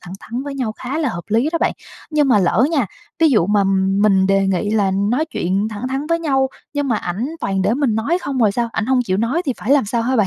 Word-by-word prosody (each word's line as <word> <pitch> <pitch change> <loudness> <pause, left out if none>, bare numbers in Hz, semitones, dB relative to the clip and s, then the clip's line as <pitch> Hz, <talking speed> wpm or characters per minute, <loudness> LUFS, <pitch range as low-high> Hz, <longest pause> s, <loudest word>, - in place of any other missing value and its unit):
thẳng 180 +1 -9
thắn 240 +3 -5
với 285 0 -6
nhau 250 -5 -2
khá 255 +6 -5
là 310 -4 0
hợp 175 -8 -5
lý 230 +7 +2
đó 335 - +1
bạn. - - +1 0.4
Nhưng 300 -3 +2
mà 230 -5 +5
lỡ 195 +5 +3
nha, 280 -9 +1 0.3
ví 325 - +6
dụ 210 -10 +3
mà 205 0 +2 0.4
mình 195 -3 +4
đề 195 0 +2
nghị 195 +2 0
là 205 -3 +2
nói 205 +10 +1
chuyện 320 - -5 0.3
thẳng 220 +4 -5
thắn 270 +3 -3
với 335 +1 +1
nhau, 270 -4 +1 0.3
nhưng 285 -1 -1
mà 230 - +2
ảnh 205 +7 -3
toàn 195 -1 -1
để 215 - +2
mình 265 -5 +1
nói 275 +11 0
không 275 -5 -3
rồi 215 -4 +3
sao, 235 +2 -1
ảnh 220 - -2
hông 260 -1 +2
chịu 185 -5 -1
nói 235 - 0
thì 265 - +1
phải 230 - -5
làm 280 -3 +4
sao 230 +3 -1
hả 255 +3 0
bạn? 215 -4 +3
235 Hz, 275 wpm, -19 LUFS, 205-275 Hz, 0.4 s, ví